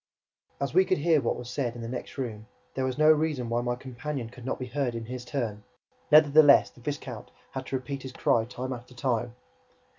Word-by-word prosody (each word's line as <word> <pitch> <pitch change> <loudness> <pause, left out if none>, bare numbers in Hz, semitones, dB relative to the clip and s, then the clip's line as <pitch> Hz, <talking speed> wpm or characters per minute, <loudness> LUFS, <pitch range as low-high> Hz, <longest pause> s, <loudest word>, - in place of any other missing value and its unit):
As 140 0 -2
we 185 +3 +6
could 185 0 +1
hear 155 0 +3
what 115 - 0
was 125 - -7
said 125 -2 -2
in 120 - -7
the - - -4
next 125 +3 -6
room, 110 -5 -5 0.3
there 130 - -1
was 130 0 -2
no 155 +1 +7
reason 150 -6 +1
why 120 +1 +1
my 120 0 -1
companion 130 -1 -5
should 125 -1 -10
not - - -1
be 130 - -5
heard 125 -1 -2
in 115 -1 -4
his 125 +1 -6
turn. 115 -7 -3 0.5
Nevertheless, 150 -1 +7
the 120 - -18
viscount 130 -4 -5 0.2
had 130 -1 -5
to - - -2
repeat 135 +1 -4
his 130 - -7
cry 115 -3 +2
time 125 +2 -5
after 125 +1 -10
time. 120 -1 -1
130 Hz, 215 wpm, -28 LUFS, 120-140 Hz, 0.5 s, no